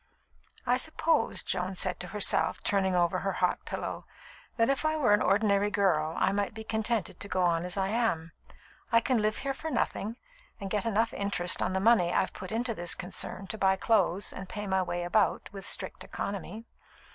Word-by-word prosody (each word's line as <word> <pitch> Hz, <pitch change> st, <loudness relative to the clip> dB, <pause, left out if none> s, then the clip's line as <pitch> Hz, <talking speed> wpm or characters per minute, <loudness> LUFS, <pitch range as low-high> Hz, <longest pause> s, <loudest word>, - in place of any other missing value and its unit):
"I 250 Hz, 0 st, +3 dB
suppose," 315 Hz, +3 st, +1 dB
Joan 185 Hz, +1 st, -2 dB
said 185 Hz, 0 st, -1 dB
to 180 Hz, -, -6 dB
herself, 205 Hz, +1 st, +1 dB
turning 190 Hz, -2 st, +1 dB
over 175 Hz, -1 st, +2 dB
her 195 Hz, 0 st, -1 dB
hot 180 Hz, -1 st, 0 dB
pillow, -, -, -5 dB, 0.5 s
"that 230 Hz, -1 st, +4 dB
if 275 Hz, +1 st, +1 dB
I 310 Hz, 0 st, +1 dB
were 245 Hz, -9 st, +4 dB
an 210 Hz, -, +4 dB
ordinary 200 Hz, 0 st, +3 dB
girl, 165 Hz, -6 st, +1 dB
I -, -, +3 dB
might 205 Hz, +1 st, -1 dB
be 220 Hz, -, -6 dB
contented 220 Hz, -1 st, -1 dB
to -, -, -5 dB
go 185 Hz, -2 st, 0 dB
on 170 Hz, -1 st, +2 dB
as 180 Hz, +2 st, -3 dB
I 190 Hz, 0 st, +1 dB
am. 205 Hz, -8 st, 0 dB, 0.6 s
I 230 Hz, -, +6 dB
can 240 Hz, -1 st, +1 dB
live 215 Hz, 0 st, +1 dB
here 275 Hz, -, 0 dB
for 320 Hz, +4 st, -5 dB
nothing, 225 Hz, -6 st, -1 dB, 0.4 s
and 195 Hz, -1 st, -6 dB
get 210 Hz, +1 st, 0 dB
enough 225 Hz, +1 st, +1 dB
interest 190 Hz, -3 st, 0 dB
on 185 Hz, -, 0 dB
the 190 Hz, -, +1 dB
money 195 Hz, -4 st, +4 dB
I've 190 Hz, -, +1 dB
put 185 Hz, -, -8 dB
into 230 Hz, +2 st, -1 dB
this 175 Hz, -4 st, -2 dB
concern 185 Hz, +1 st, -3 dB
to 220 Hz, -, -5 dB
buy 190 Hz, 0 st, +4 dB
clothes 195 Hz, -2 st, +1 dB
and 185 Hz, 0 st, -8 dB
pay 210 Hz, 0 st, -5 dB
my 190 Hz, -1 st, +1 dB
way 175 Hz, -1 st, -2 dB
about, 190 Hz, +5 st, +1 dB
with 195 Hz, -1 st, -6 dB
strict -, -, -3 dB
economy. 200 Hz, +3 st, -5 dB
200 Hz, 200 wpm, -29 LUFS, 185-225 Hz, 0.6 s, I